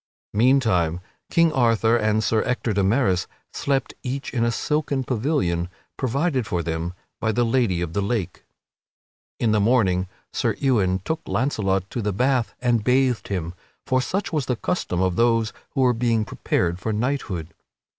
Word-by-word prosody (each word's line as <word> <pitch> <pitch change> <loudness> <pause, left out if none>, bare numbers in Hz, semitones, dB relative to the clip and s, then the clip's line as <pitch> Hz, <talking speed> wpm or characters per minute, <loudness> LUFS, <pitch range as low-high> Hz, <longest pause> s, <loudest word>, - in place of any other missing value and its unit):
Meantime 105 -8 +3 0.3
King 165 -2 +3
Arthur 115 -3 +3
and 110 -1 +2
Sir 110 -1 +2
Ector 125 -3 -1
de 100 - +1
Maris 95 -4 +2 0.3
slept 140 -1 -1
each 135 +1 -4
in 120 -3 +1
a 120 - +3
silken 145 +2 -1
pavilion 110 - 0 0.3
provided 135 -1 0
for 85 -1 -1
them 80 +2 -3 0.2
by 110 - +1
the 120 +3 +1
Lady 115 -7 +1
of 85 -2 -3
the 100 - 0
Lake. 100 -3 -2 1.0
In 115 - +2
the 105 - +3
morning 100 -5 +2 0.3
Sir - - 0
Ewain 100 -9 +2
took 160 - -2
Launcelot 95 -4 0
to 120 - -2
the 105 0 0
bath 125 +3 +1
and 120 -3 +2
bathed 125 0 +2
him, 90 -4 -3 0.3
for 130 0 +2
such 190 +6 -2
was 150 -5 0
the 125 - +1
custom 115 - -2
of 95 -1 +1
those 115 -2 +2 0.2
who 135 - +2
were 125 -1 +4
being 115 -2 +1
prepared 85 -3 -1
for 110 +3 -2
knighthood. 105 - -2
115 Hz, 165 wpm, -23 LUFS, 95-130 Hz, 1.0 s, were